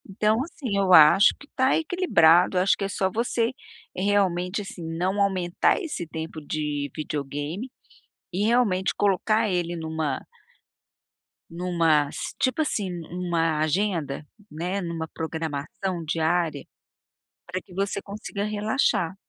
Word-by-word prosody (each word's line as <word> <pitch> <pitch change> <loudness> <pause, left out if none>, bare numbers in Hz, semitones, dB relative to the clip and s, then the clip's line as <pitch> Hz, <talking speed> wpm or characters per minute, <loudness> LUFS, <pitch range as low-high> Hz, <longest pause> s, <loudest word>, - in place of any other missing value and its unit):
Então, 215 +4 +1
assim, 265 -9 -4
eu 195 -2 +3
acho 180 +5 +8
que 285 - -14
tá 260 0 +3
equilibrado. 185 - +4
Acho 185 +2 +4
que - - -4
é - - -1
só 190 -1 0
você 230 +2 0 0.4
realmente, 190 -1 +1
assim, 195 -3 -9
não 180 +5 -1
aumentar 185 - +2
esse 300 - -4
tempo 160 0 -6
de 145 -1 -3
videogame 150 - -4 0.6
e 190 +4 0
realmente 210 -6 +2
colocar 215 +3 +2
ele 175 -1 -1
numa 160 -4 -3 1.3
numa 165 -4 +2
s - - -5
tipo 260 +4 +1
assim, 210 -10 -1
numa 170 -2 -1
agenda, 155 -3 -1 0.2
né, 180 +5 -3
numa 165 -2 -4
programação 160 +3 -4
diária 160 -2 0 0.8
para 180 +1 -4
que 190 - -18
você 200 +1 -1
consiga 200 0 -5
relaxar 210 - 0
180 Hz, 125 wpm, -25 LUFS, 160-205 Hz, 1.3 s, acho